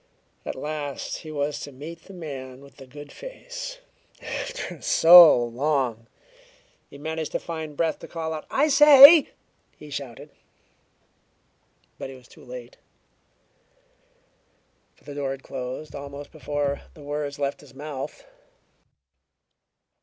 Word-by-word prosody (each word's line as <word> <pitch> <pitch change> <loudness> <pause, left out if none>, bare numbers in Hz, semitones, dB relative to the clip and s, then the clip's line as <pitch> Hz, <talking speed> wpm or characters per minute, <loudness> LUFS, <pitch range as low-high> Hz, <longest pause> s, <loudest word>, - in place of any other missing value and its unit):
At - - -4
last 145 0 -5
he 155 - -10
was 145 0 -2
to 145 - -8
meet 155 +6 -10
the 195 - -13
man 135 -6 -8
with 140 0 -17
the 135 - -13
"good 145 +3 -12
face" - - -8 0.4
after - - -6
so 165 -7 +8
long! 120 -2 -1 0.8
He - - -12
managed 160 +1 -4
to - - 0
find 160 -3 -7
breath 165 -2 0
to - - -10
call 160 -1 -4
out. 155 - -7
"I 290 +3 +2
say!" 295 +2 +9 0.5
he 150 -1 -13
shouted. 140 +1 -7 1.7
But - - -6
he 135 - -10
was 125 -1 -17
too - - -17
late, 125 -1 -10 2.2
for - - -28
the 145 - -9
door 140 -1 -3
had 135 0 -6
closed 130 +3 -7
almost 140 0 -9
before 145 -2 -3
the 150 - -13
words 145 0 -4
left 140 -1 -3
his 135 -3 -17
mouth. 150 - -7
145 Hz, 130 wpm, -25 LUFS, 135-160 Hz, 2.2 s, say